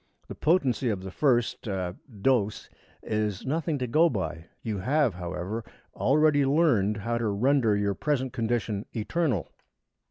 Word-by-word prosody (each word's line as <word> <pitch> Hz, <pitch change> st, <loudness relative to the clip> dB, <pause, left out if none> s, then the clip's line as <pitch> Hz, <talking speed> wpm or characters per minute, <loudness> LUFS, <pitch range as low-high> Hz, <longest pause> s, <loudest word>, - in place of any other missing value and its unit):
The -, -, -6 dB
potency 135 Hz, -7 st, +1 dB
of 100 Hz, -4 st, -2 dB
the 95 Hz, -, -6 dB
first 120 Hz, -2 st, +1 dB
er 95 Hz, -3 st, -2 dB, 0.3 s
dose, 110 Hz, -6 st, +1 dB, 0.4 s
is 105 Hz, -3 st, -2 dB
nothing 155 Hz, +2 st, -1 dB
to 130 Hz, -, -2 dB
go 155 Hz, +8 st, +4 dB
by. 80 Hz, -, -4 dB, 0.2 s
You 110 Hz, -4 st, -2 dB
have, 135 Hz, +2 st, +2 dB
however, 90 Hz, +5 st, -4 dB, 0.3 s
already 145 Hz, +1 st, +3 dB
learned 135 Hz, -, +3 dB
how 115 Hz, +3 st, -2 dB
to 115 Hz, -, 0 dB
render 110 Hz, +1 st, +2 dB
your 100 Hz, -1 st, 0 dB
present 130 Hz, +3 st, -1 dB
condition 115 Hz, -3 st, -1 dB
eternal." 120 Hz, -, -1 dB
115 Hz, 145 wpm, -27 LUFS, 100-140 Hz, 0.4 s, go